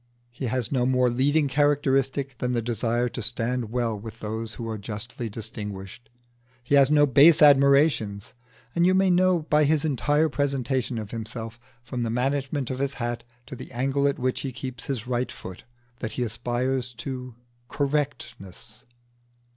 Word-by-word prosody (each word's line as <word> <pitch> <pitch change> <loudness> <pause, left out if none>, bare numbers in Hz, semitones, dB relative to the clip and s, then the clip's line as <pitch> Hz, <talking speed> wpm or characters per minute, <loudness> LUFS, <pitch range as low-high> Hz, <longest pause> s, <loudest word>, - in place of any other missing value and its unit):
He 120 - -5
has 120 -1 -1
no 125 -3 +1
more 125 -1 +3
leading 145 +5 +2
characteristic 135 -1 +1
than 125 0 -1
the 120 - 0
desire 120 +1 0
to 120 - -6
stand 115 +1 -2
well 120 -1 -1
with 110 +2 -9
those 110 +1 -5
who 115 - -6
are 110 -1 -4
justly 110 +3 -5
distinguished; 105 0 -6 0.5
he 120 - -3
has 140 -1 +6
no 150 -1 +5
base 145 +4 +6
admirations, 140 -8 +4 0.4
and 170 - +2
you 185 - +4
may 190 -1 +4
know 180 -2 +3
by 150 0 +3
his 150 +1 +2
entire 150 +2 +2
presentation 135 -4 -1
of 105 -2 -6
himself, 115 0 -6 0.2
from 125 0 -5
the 115 - -1
management 135 +2 -1
of 130 - -4
his 140 0 -1
hat 120 -1 -3 0.2
to - - -8
the 125 - -10
angle 135 +3 0
at 140 - 0
which 130 0 -1
he 135 - -4
keeps 125 -1 -5
his 130 -4 -3
right 125 0 -1
foot, 95 -1 -10 0.3
that 110 - -4
he 125 - -1
aspires 120 +2 -2
to 125 0 -6 0.3
correctness. 135 -7 -4
125 Hz, 165 wpm, -25 LUFS, 115-140 Hz, 0.5 s, has